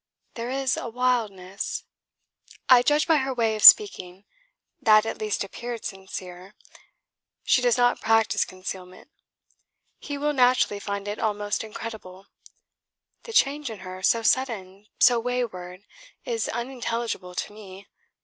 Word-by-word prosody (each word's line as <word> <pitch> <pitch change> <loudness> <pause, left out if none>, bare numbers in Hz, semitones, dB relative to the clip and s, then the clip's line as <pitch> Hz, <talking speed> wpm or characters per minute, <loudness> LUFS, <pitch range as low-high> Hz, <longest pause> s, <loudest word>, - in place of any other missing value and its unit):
There 235 +1 -5
is 265 0 -1
a 240 - -5
wildness... 220 -6 -2 0.8
I 250 -2 +7
judge 295 +4 +2
by 325 -2 +3
her 265 -2 -2
way 225 -2 +1
of 215 - -5
speaking; 195 - +6 0.6
that 215 -1 +5
at 225 - -5
least 215 -2 -2
appeared 235 +3 -7
sincere. 190 -1 -8 0.9
She 255 - +3
does 245 -1 +2
not 245 0 +2
practise 225 0 +2
concealment. 185 +5 -9 0.9
He 285 -1 -6
will 295 +1 -1
naturally 250 -5 +2
find 200 0 -5
it 205 +1 -4
almost 210 -1 -2
incredible. 210 -4 -9 1.0
The 460 - -8
change 290 - +2
in 215 -4 -9
her, 185 0 -9
so 230 +4 +2
sudden, 210 -6 -1
so 245 -2 +5
wayward, 215 -7 -4 0.4
is 465 -2 -2
unintelligible 235 -6 -4
to 205 - -4
me. 200 -2 -13
220 Hz, 130 wpm, -25 LUFS, 195-250 Hz, 1.0 s, I